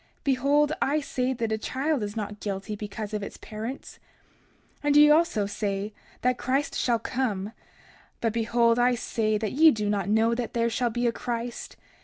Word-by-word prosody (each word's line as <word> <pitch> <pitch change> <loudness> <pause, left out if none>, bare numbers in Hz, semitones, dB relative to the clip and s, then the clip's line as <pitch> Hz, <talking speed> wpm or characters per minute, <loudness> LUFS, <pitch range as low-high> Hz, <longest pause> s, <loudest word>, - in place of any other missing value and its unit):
Behold, 285 +3 +2
I 290 +3 +2
say 255 -3 -1
that 230 -3 -2
a 220 - 0
child 275 +4 -1
is 205 0 -4
not 210 -1 -4
guilty 200 +1 -4
because 210 +1 -6
of 210 - -2
its 200 - -7
parents. 225 +5 -7 0.8
30:26 - - -34
And 290 0 +3
ye 295 0 +8
also 300 -10 +3
say 200 0 -3 0.3
that 250 0 +1
Christ 270 +3 0
shall 240 -2 +2
come. 220 -5 -2 0.7
But 230 -2 0
behold, 230 +1 +2
I 245 0 +4
say 215 -2 0
that 215 -1 -2
ye 320 +4 +7
do 210 -7 0
not 200 -2 -1
know 220 +2 +3
that 235 -1 -3
there 235 0 +1
shall 240 +1 0
be 240 +2 -2
a 235 - +3
Christ. 235 0 -5
230 Hz, 185 wpm, -26 LUFS, 215-255 Hz, 0.8 s, ye